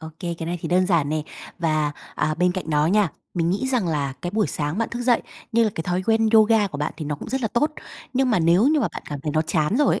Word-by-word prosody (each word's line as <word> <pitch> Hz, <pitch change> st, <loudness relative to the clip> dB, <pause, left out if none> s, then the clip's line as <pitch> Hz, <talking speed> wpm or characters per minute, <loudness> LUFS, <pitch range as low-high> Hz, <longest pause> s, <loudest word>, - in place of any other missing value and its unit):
Ô 160 Hz, -, -7 dB
kê, 175 Hz, -2 st, -3 dB
cái 165 Hz, -, -4 dB
này 175 Hz, +1 st, -3 dB
thì -, -, -4 dB
đơn 185 Hz, +1 st, +3 dB
giản 165 Hz, -6 st, +2 dB
nè. 155 Hz, 0 st, -1 dB, 0.4 s
Và, 155 Hz, -3 st, +1 dB, 0.2 s
à, 155 Hz, -, 0 dB
bên 180 Hz, +2 st, +2 dB
cạnh 180 Hz, -3 st, -5 dB
đó 150 Hz, 0 st, +3 dB
nha, 200 Hz, +2 st, +3 dB, 0.3 s
mình 170 Hz, -1 st, +1 dB
nghĩ 200 Hz, +8 st, -1 dB
rằng 240 Hz, -9 st, 0 dB
là 145 Hz, -4 st, -1 dB
cái 175 Hz, -, -2 dB
buổi 215 Hz, +1 st, +1 dB
sáng 150 Hz, +4 st, -3 dB
bạn 230 Hz, -, 0 dB
thức 240 Hz, +1 st, -4 dB
dậy, 245 Hz, -1 st, +3 dB, 0.3 s
như 230 Hz, 0 st, +4 dB
là 215 Hz, -, +1 dB
cái 160 Hz, -, -3 dB
thói 180 Hz, +2 st, -1 dB
quen 225 Hz, 0 st, +3 dB
yoga 220 Hz, -1 st, +5 dB
của 150 Hz, -7 st, -7 dB
bạn 150 Hz, -, -2 dB
thì 155 Hz, -, -5 dB
nó 145 Hz, 0 st, -2 dB
cũng 145 Hz, -, -9 dB
rất 265 Hz, +3 st, -1 dB
là 225 Hz, -, +1 dB
tốt, 270 Hz, +8 st, +1 dB, 0.4 s
nhưng 260 Hz, -1 st, +2 dB
mà 220 Hz, -, +3 dB
nếu 170 Hz, +5 st, +4 dB
như 305 Hz, -1 st, +3 dB
mà 225 Hz, -, +1 dB
bạn -, -, -7 dB
cảm 145 Hz, -2 st, -5 dB
thấy 150 Hz, +1 st, -3 dB
nó 155 Hz, +1 st, +2 dB
chán 155 Hz, +5 st, 0 dB
rồi 290 Hz, 0 st, +3 dB
ấy, -, -, -3 dB
180 Hz, 300 wpm, -23 LUFS, 155-225 Hz, 0.4 s, yoga